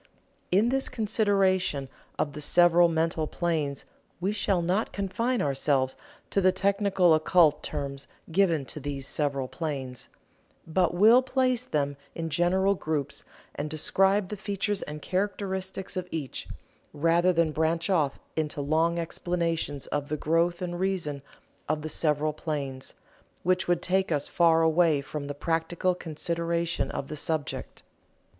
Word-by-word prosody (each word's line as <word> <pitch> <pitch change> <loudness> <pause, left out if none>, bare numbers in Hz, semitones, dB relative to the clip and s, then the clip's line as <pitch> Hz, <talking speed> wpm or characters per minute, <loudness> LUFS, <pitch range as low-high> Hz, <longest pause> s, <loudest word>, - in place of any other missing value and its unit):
In 205 +6 +4
this 270 +1 0
consideration 195 - +1 0.3
of 145 - -1
the 150 - -6
several 175 +2 +5
mental 160 -1 0
planes 155 -6 -2 0.3
we 190 +3 0
shall 195 -4 0
not 185 +6 0
confine 230 +6 -1
ourselves 135 -1 +1 0.4
to 200 - +2
the 185 0 +5
technical 195 -2 +3
occult 155 -1 +4
terms 140 -2 -5 0.2
given 165 -5 +2
to 150 - -6
these 140 -1 -5
several 140 -3 -1
planes, 135 -6 -5 0.6
but 175 +1 +1
will 220 +7 +7
place 255 -1 +1
them 145 - -1 0.2
in 165 -1 -4
general 190 +4 +3
groups 155 -6 -3 0.3
and 145 +1 -4
describe 190 +5 +2
the 210 - -5
features 200 0 -2
and 150 0 -7
characteristics 190 -1 -3
of 180 -1 -3
each, 155 -7 -5 0.5
rather 165 +4 +3
than 165 -2 +2
branch 160 +2 0
off 155 -8 +1 0.2
into 155 -2 -2
long 160 +4 +1
explanations 165 -4 -2
of 145 -1 -2
the 155 - -1
growth 170 +4 +1
and 175 -1 -4
reason 180 -7 -1 0.5
of 155 0 0
the 155 - -4
several 150 0 0
planes, 140 -4 -5 0.5
which 185 +1 +1
would 175 0 +1
take 190 0 +1
us 145 -2 0
far 165 -1 +4
away 160 -2 +4
from 145 +1 -5
the 145 - -5
practical 165 +4 0
consideration 170 0 -2
of 135 - -4
the 155 - -6
subject. 155 0 -4
165 Hz, 140 wpm, -27 LUFS, 150-185 Hz, 0.6 s, will